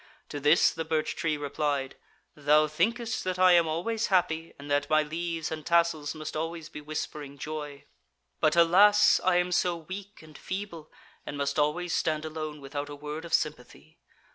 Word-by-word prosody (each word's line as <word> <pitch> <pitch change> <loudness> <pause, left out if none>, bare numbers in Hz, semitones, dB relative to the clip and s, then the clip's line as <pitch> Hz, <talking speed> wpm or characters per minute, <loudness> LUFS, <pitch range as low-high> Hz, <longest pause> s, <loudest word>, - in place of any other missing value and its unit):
To 145 - -5
this 150 +4 +4
the 165 - -4
birch 160 -1 -1
tree 160 -3 -1
replied: 145 -1 -2 0.4
'Thou 150 +1 +3
thinkest 225 +9 -1
that 185 0 -2
I 185 0 +6
am 170 -2 +5
always 215 +9 -1
happy, 165 -3 +1
and 140 - -11
that 145 0 +1
my 155 0 +4
leaves 165 +1 -4
and 155 -1 -5
tassels 170 -2 +1
must 155 0 -6
always 165 0 -4
be 150 - -9
whispering 150 -1 -6
joy. 150 -1 -6 0.6
But, 155 0 +3
alas! 195 +5 +6
I 185 -1 +3
am 180 0 +1
so 175 -1 +1
weak 190 +4 -9
and 155 -1 -15
feeble, 185 -5 -6 0.3
and 145 - -6
must 140 0 -1
always 165 +4 0
stand 155 -1 0
alone 155 -1 -6
without 145 +1 -5
a 145 - -7
word 150 +3 -6
of 170 - -8
sympathy. 125 - -5
155 Hz, 175 wpm, -28 LUFS, 150-170 Hz, 0.6 s, I